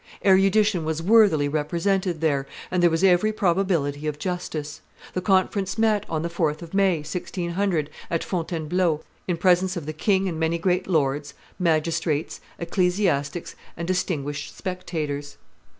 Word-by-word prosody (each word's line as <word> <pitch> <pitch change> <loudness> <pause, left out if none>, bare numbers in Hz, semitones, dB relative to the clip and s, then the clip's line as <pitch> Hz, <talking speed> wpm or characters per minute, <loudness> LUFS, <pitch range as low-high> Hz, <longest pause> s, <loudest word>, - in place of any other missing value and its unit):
Erudition 195 -1 +4
was 160 0 -2
worthily 195 -8 +5
represented 170 +4 0
there, 140 -4 +1 0.2
and 180 -1 +1
there 175 - +6
was 165 +2 0
every 190 +3 +4
probability 170 -7 0
of 150 -1 -2
justice. 155 -3 -4 0.3
The 185 - -1
conference 195 +1 +1
met 220 -2 +2
on 160 -1 -1
the - - 0
4th 165 -2 -1
of 165 - -11
May, 195 -5 +3
1600, 170 0 -2 0.2
at 165 - -1
Fontainebleau, 165 -1 -1 0.2
in 175 -2 0
presence 185 +1 +3
of 165 - -5
the 155 - -4
king 190 +4 +1
and 165 -3 -3
many 160 +1 +1
great 180 +1 0
lords, 145 -4 0 0.2
magistrates, 160 -2 0 0.2
ecclesiastics, 175 -3 0 0.2
and 170 0 -4
distinguished 150 -6 -2
spectators. 155 -6 -4
170 Hz, 140 wpm, -24 LUFS, 155-185 Hz, 0.3 s, there